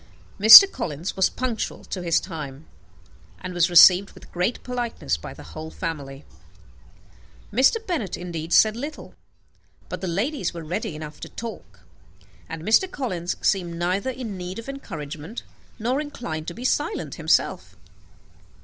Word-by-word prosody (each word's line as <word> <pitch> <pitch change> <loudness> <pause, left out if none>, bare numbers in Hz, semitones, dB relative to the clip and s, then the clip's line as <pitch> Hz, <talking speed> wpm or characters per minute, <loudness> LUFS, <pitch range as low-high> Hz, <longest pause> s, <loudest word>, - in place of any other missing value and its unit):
Mr. 220 - +12
Collins 175 - -5
was 190 -1 +3
punctual 250 -3 -4
to 185 - -6
his 170 -2 +2
time, 150 -4 -8 0.7
and 185 - -7
was 175 0 +2
received 180 +3 +7
with - - -16
great 180 +7 -2
politeness 240 - -3
by 80 - -9
the - - -12
whole 160 0 -7
family. 145 -5 -6 1.3
Mr. 260 - +4
Bennet 260 - -3
indeed 170 -2 -6
said 215 +3 +5
little; 290 +6 -7 0.8
but 180 - -6
the 190 - -3
ladies 195 - -2
were 165 - -6
ready 170 +1 -4
enough 150 -1 -9
to - - -8
talk, 185 - -9 0.7
and 160 -1 -7
Mr. 225 - +3
Collins 185 - -3
seemed 175 -4 0
neither 180 +8 -1
in 240 -6 -6
need 180 +1 -6
of 230 - -8
encouragement, 160 - -7 0.3
nor 245 +5 -1
inclined 175 - -6
to 170 - -5
be 245 - -7
silent 295 +9 -1
himself. - - 0
185 Hz, 145 wpm, -23 LUFS, 165-235 Hz, 1.3 s, Mr